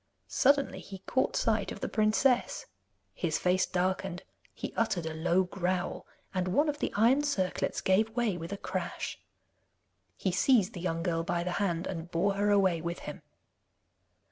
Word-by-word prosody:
Suddenly 280 +1 +2
he 195 - -9
caught 260 - +1
sight - - +1
of - - -7
the - - -2
princess; 225 +4 +2 0.5
his 160 -3 -1
face 185 +1 +2
darkened, 185 0 -1 0.3
he - - -6
uttered 190 -7 0
a 160 - -3
low 170 +3 +2
growl, 180 0 -2 0.3
and 185 -1 0
one 285 +12 +2
of 295 0 -2
the - - -1
iron 235 +7 +5
circlets 200 -11 -1
gave 200 +4 +3
way 235 -6 +1
with 170 +1 -6
a 200 - -3
crash. - - -4 1.0
He 190 - 0
seized 205 +1 +3
the 175 - -6
young 165 -2 -1
girl 165 -3 0
by 170 +1 -1
the 180 - -2
hand 175 -3 0
and 170 -2 -5
bore 180 +4 +1
her 205 +1 +1
away 190 -5 +3
with 170 +1 -3
him. - - -7
185 Hz, 170 wpm, -30 LUFS, 175-215 Hz, 1.0 s, iron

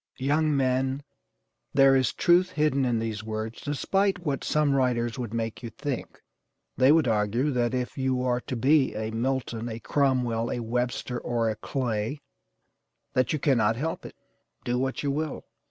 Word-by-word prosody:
Young 150 +2 +1
men, 130 +1 0 0.7
there 135 0 +6
is 130 -2 +2
truth 180 +1 +3
hidden 150 -3 +2
in 120 -2 +1
these 110 -2 -3
words, 110 +1 -5
despite 190 +6 0
what 140 -3 -1
some 150 -2 +2
writers 125 -2 0
would 120 -4 -4
make 115 -1 -3
you 120 - -5
think. 125 +3 -5 0.6
They 130 +2 +5
would 155 -3 +4
argue 115 +6 +1
that 125 -1 0
if 125 +1 -3
you 130 -1 0
are 125 -1 +1
to 130 - -5
be 135 +3 +3
a 110 +1 -3
Milton, 120 -1 -2
a 110 0 -5
Cromwell, 125 -3 +1
a - - -2
Webster, 120 +1 -2
or 115 -2 0
a - - -4
Clay, 120 +2 -2 0.9
that 130 - +2
you 155 - +1
cannot 120 -6 +2
help 160 +7 -3
it, - - -10 0.5
do 120 +1 0
what 135 +2 -2
you 140 - +1
will. 155 +1 -3
130 Hz, 170 wpm, -27 LUFS, 115-140 Hz, 0.9 s, there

